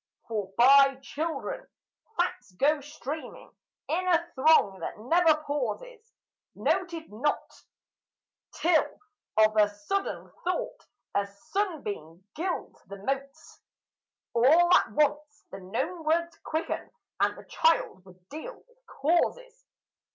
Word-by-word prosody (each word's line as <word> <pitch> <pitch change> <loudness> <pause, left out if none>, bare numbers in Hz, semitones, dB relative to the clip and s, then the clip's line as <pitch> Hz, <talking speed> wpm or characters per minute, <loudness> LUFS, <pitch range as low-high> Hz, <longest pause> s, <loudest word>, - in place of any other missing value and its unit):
For 210 -4 -3
by 275 +2 +7
children 330 - -4 0.5
facts 250 - -1
go 285 +9 +2
streaming 295 +1 -7 0.4
in 365 +3 -1
a 345 -1 +2
throng 260 -9 +4
that - - -5
never 310 +6 +3
pauses, 455 +11 -4 0.4
Noted 335 - -1
not, 260 +8 -1 1.1
till, 330 -1 +2 0.4
of 215 0 +5
a 210 -1 +5
sudden, 205 - -3
thought, 360 +1 -3 0.3
a 200 0 +1
sunbeam, 205 - -4
gilds 350 +3 -4
the 200 +2 -8
motes, 275 +6 -5 0.7
All 320 +9 +5
at - - +4
once 295 0 0
the 195 - -7
known 265 - -3
words 335 +2 +1
quicken, 320 +1 -3 0.3
and - - +2
the - - -12
child 485 - +1
would 185 -1 -19
deal 315 - -7
with - - -27
causes. 485 - 0
305 Hz, 115 wpm, -28 LUFS, 230-350 Hz, 1.1 s, by